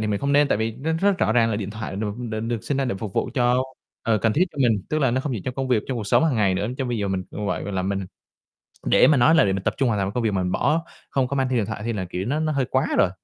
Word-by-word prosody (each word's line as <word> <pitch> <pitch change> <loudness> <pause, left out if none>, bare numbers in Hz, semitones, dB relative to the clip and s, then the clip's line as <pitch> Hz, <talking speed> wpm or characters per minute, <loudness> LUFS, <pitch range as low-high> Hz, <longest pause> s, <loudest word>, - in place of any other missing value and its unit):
thì 110 - -1
mình 100 -1 -1
không 140 0 0
nên, 145 0 +4
tại 105 - +1
vì 110 +1 -1
nó 155 +5 -2
rất 200 -1 +2
rõ 110 - +2
ràng 115 -1 +3
là 105 - 0
điện 105 -2 -4
thoại 105 -2 -6
được 105 0 -3
được 110 -3 -4
được 115 0 -3
sinh 145 - -1
ra 135 - +1
để 125 - -1
phục 105 -2 -5
vụ - - 0
cho, 125 -1 +3 0.4
ờ, 110 -2 +2
cần 110 +1 +1
thiết 170 +10 +3
cho 150 - -11
mình. 115 -7 +2
Tức 155 - 0
là 135 -5 +2
nó 130 +2 0
không 140 0 -3
chỉ 115 - -3
trong 130 - -3
công 135 0 -3
việc, 120 -4 +2
trong 130 - -3
cuộc 110 -3 -4
sống 160 - +4
hàng 150 -6 +1
ngày 100 -3 +2
nữa, 100 +3 -1
chứ 135 - -1
bây 120 -2 -2
giờ 100 -1 -1
mình 95 -1 -1
cũng 105 - -4
vậy, 90 - -2
gọi 100 - -5
là, 95 -1 -1
mình 95 0 -2 0.8
để - - +5
mà 150 - +5
nói 135 +6 +5
là 165 - +5
để 95 - +1
mình 95 -1 -2
tập - - 0
trung 135 - +1
hoàn 110 -3 0
toàn 95 0 -1
công 125 - -1
việc 110 - +1
mà 95 -2 0
mình 90 - -1
bỏ, 165 +2 +1 0.3
không 130 -2 +1
có 140 - -2
mang 135 -1 +1
theo 125 - 0
điện 105 - 0
thoại 105 -1 -5
thì 115 - -1
là, 95 -3 -3
kiểu, 90 +1 -4
nó 145 +5 0
nó 155 -1 0
hơi 140 -3 +1
quá 130 +1 0
rồi, 90 - +4
115 Hz, 360 wpm, -23 LUFS, 105-135 Hz, 0.8 s, để